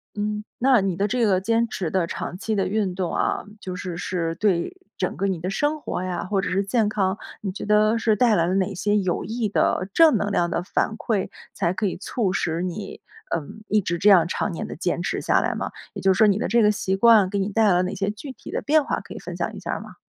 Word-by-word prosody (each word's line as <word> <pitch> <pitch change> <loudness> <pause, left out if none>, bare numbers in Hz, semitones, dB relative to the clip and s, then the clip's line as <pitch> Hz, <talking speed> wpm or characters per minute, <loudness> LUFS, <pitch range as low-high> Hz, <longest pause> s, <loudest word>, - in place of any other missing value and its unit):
嗯， 210 0 -2 0.2
那 260 -1 +5
你 190 -2 -1
的 200 +4 0
这 235 +2 +1
个 190 -3 +2
坚 230 +3 +1
持 190 -6 -3
的 185 0 +1
长 175 - -5
期 220 +3 -2
的 195 - +1
运 200 -2 0
动 180 -1 -3
啊， - - 0 0.2
就 185 -2 -6
是 180 -2 -5
是 170 -2 -2
对 200 - 0 0.2
整 - - -2
个 195 - -1
你 190 -3 -1
的 180 +3 -3
生 295 +9 -1
活 180 - -3
呀， 180 -2 -3
或 195 +1 0
者 195 - -2
是 195 +2 +1
健 215 +2 +1
康， 195 -2 0 0.2
你 195 - -3
觉 190 - -6
得 215 +2 +3
是 225 -1 +2
带 230 0 +4
来 165 - +2
了 180 - 0
哪 195 +1 0
些 205 +3 +1
有 185 -4 -1
益 225 +1 -2
的 185 -2 +1
正 325 -4 +6
能 205 0 -1
量 175 -3 +1
的 175 - 0
反 210 +3 -1
馈， 210 -5 -1 0.2
才 175 -3 0
可 205 +2 -1
以 185 - -3
促 200 +1 -1
使 165 -2 -1
你， 185 +3 -5 0.3
嗯， 170 +7 -7
一 210 0 +3
直 175 -2 -2
这 205 +5 +5
样 175 -4 +6
常 190 - -2
年 165 - -5
地 - - -7
坚 175 +2 -1
持 175 - -2
下 - - +2
来 - - -1
吗？ - - -4 0.2
也 - - -5
就 190 0 +5
是 - - -4
说 220 - +7
你 200 -1 +3
的 - - -1
这 235 +3 +3
个 210 -1 +5
习 190 -2 -1
惯， 215 -1 +6
给 200 - 0
你 195 +1 -1
带 225 +2 +2
来 200 - +5
了 180 - +3
哪 185 +2 -2
些 200 +1 -1
具 265 +7 -8
体 - - -11
的 - - -2
变 305 +1 +3
化 - - -1
可 - - -11
以 - - -6
分 - - -7
享 - - -3
一 - - -7
下 - - -4
儿 - - -3
吗？ - - -12
195 Hz, 295 characters per minute, -23 LUFS, 185-215 Hz, 0.3 s, 说